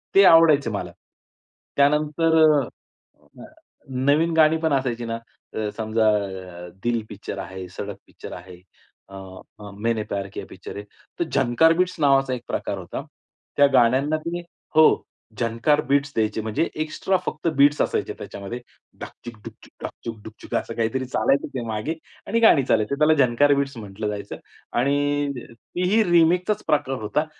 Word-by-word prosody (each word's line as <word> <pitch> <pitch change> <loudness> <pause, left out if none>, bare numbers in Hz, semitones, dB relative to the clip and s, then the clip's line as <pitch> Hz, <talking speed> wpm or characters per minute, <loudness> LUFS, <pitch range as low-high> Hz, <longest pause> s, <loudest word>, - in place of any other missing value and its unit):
ते 195 - +8
आवडायचं 165 -4 +6
मला. - - -4 0.9
त्यानंतर 150 +3 +3
अ, 150 -2 +5 0.8
अ, - - -9 0.5
नवीन 145 +6 +2
गाणी 155 0 +5
पण 160 -2 0
असायची 125 -3 -1
ना, 115 0 -3 0.3
अ, 110 -1 -2
समजा 110 0 +1 0.6
अ, - - -11
दिल 120 -2 0
पिक्चर 100 -1 -7
आहे, 95 -1 -7
सडक 100 +2 -7
पिक्चर - - -10
आहे, 90 0 -11 0.5
अ, 95 - -11 0.6
मैंने 115 0 0
प्यार 100 -2 -4
किया - - -6
पिक्चर - - -10
आहे. 100 - -6 0.4
ते 170 - +1
झंकार 135 +5 +4
बिट्स 180 0 +1
नावाचा 135 -2 +3
एक 120 -2 -5
प्रकार 100 - -3
होता, 90 -2 -6 0.5
त्या 145 - +7
गाण्यांना 130 +5 +3
ते 170 +2 -4 0.4
हो, 155 - +7 0.6
"झंकार 115 +6 +1
बीट्स" 140 0 +2
द्यायचे. 110 0 0
म्हणजे 110 +6 -1 0.2
एक्स्ट्रा 185 +4 -1
फक्त 155 +2 -3
बीट्स 145 +1 +5
असायचे - - -1
त्याच्यामध्ये, 100 +5 -7 0.4
डाकचिक 120 -1 -9
डाकचुक 105 - -13
डाकचिक 115 - -6
डुकचुक 110 0 -8
असं 115 - -2
काहीतरी 115 +3 -1
चालायचं 135 +2 +1
ते 130 - -3
मागे 110 +8 -2 0.3
आणि 230 - +1
गाणी 220 -11 +6
चालायचे, 115 +1 +1
त्याला 155 +2 +4
"झंकार 145 +4 +3
बीट्स" 140 -2 -1
म्हटलं 105 0 -6
जायचं 105 -1 -5 0.4
आणि 145 +2 +1 0.2
तीही 180 - 0
रिमिक्सचाच 180 +5 +3
प्रकार 135 -3 +1
होता. 150 +9 0
135 Hz, 150 wpm, -23 LUFS, 110-155 Hz, 0.9 s, ते